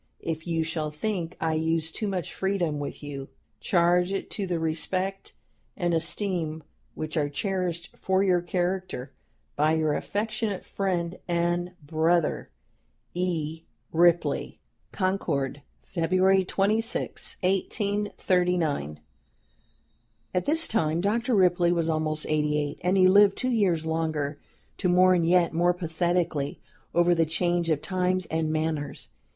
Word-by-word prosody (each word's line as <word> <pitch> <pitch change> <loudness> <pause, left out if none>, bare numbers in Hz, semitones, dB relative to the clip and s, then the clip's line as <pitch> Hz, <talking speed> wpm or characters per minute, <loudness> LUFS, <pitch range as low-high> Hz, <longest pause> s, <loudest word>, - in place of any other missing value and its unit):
If 160 0 -4
you 165 -1 0
shall 160 -1 -2
think 170 +2 -3
I 160 -1 0
use 160 0 0
too 215 - -3
much 185 -4 -3
freedom 180 -6 -1
with 145 +1 -6
you, 140 -2 -6 0.3
charge 175 +1 +2
it 195 - -3
to 200 -2 -2
the 175 -2 -1
respect 185 +4 -2 0.4
and 175 -1 0
esteem 165 -2 -1 0.3
which 155 +1 -4
are 145 -2 +1
cherished 175 +2 -3
for 190 0 +1
your 180 -3 +3
character 175 -6 -2 0.4
by 155 +2 +3
your 155 -2 +1
affectionate 215 0 -2
friend 180 -3 -2
and 175 +1 0
brother, 160 +2 +1 0.6
"E. 165 -3 -2 0.3
RIPLEY. 170 +1 +2 0.3
"CONCORD, 160 -8 -1 0.2
February 185 +2 +2
26, 215 +5 0
1839." 180 - 0 1.3
At 180 - 0
this 320 +3 +4
time 165 -6 +1
Dr. 230 +5 +1
Ripley 175 -2 +4
was 170 -2 +1
almost 155 -1 0
eighty 150 -1 +1
eight, 145 -1 -3
and 180 +3 +2
he 185 -1 +6
lived 200 +1 +6
two 255 - -1
years 185 -9 +2
longer, 155 -3 -1 0.4
to 185 - +1
mourn 180 -1 +5
yet 175 -1 +3
more 175 +2 +3
pathetically 170 -3 -1 0.4
over 175 0 +5
the 165 -1 +3
change 175 +1 0
of 155 -2 0
times 185 0 0
and 160 -1 0
manners. 155 - -2
175 Hz, 130 wpm, -27 LUFS, 160-185 Hz, 1.3 s, he